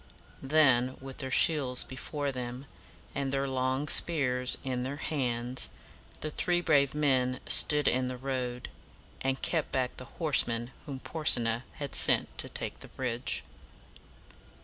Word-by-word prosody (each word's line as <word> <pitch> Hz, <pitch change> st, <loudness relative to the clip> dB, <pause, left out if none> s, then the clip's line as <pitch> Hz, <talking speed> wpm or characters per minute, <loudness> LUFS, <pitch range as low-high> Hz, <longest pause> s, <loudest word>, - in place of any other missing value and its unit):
Then, 130 Hz, -3 st, +3 dB
with 135 Hz, 0 st, -10 dB
their 135 Hz, -2 st, -2 dB
shields 130 Hz, -3 st, +3 dB
before 140 Hz, +2 st, -4 dB
them, 125 Hz, +1 st, -6 dB, 0.5 s
and 140 Hz, -1 st, -2 dB
their 135 Hz, 0 st, -1 dB
long 130 Hz, +2 st, -1 dB
spears 125 Hz, -8 st, +2 dB
in 130 Hz, -2 st, -2 dB
their 130 Hz, +3 st, -3 dB
hands, 125 Hz, -4 st, -2 dB, 0.5 s
the 155 Hz, -, -2 dB
three 175 Hz, +3 st, +1 dB
brave 145 Hz, -5 st, +2 dB
men 130 Hz, -4 st, +1 dB
stood 150 Hz, -1 st, +5 dB
in 130 Hz, 0 st, +2 dB
the 125 Hz, 0 st, -5 dB
road, 125 Hz, -2 st, -4 dB, 0.5 s
and 135 Hz, 0 st, -1 dB
kept 160 Hz, -3 st, -1 dB
back 130 Hz, -1 st, -1 dB
the 130 Hz, -, -7 dB
horsemen 120 Hz, -6 st, +1 dB, 0.2 s
whom 135 Hz, -2 st, -6 dB
Porsena 120 Hz, -7 st, +2 dB
had 145 Hz, -2 st, -6 dB
sent -, -, +3 dB
to -, -, -2 dB
take -, -, -5 dB
the -, -, -8 dB
bridge. 120 Hz, -, -2 dB
130 Hz, 140 wpm, -30 LUFS, 125-145 Hz, 0.5 s, stood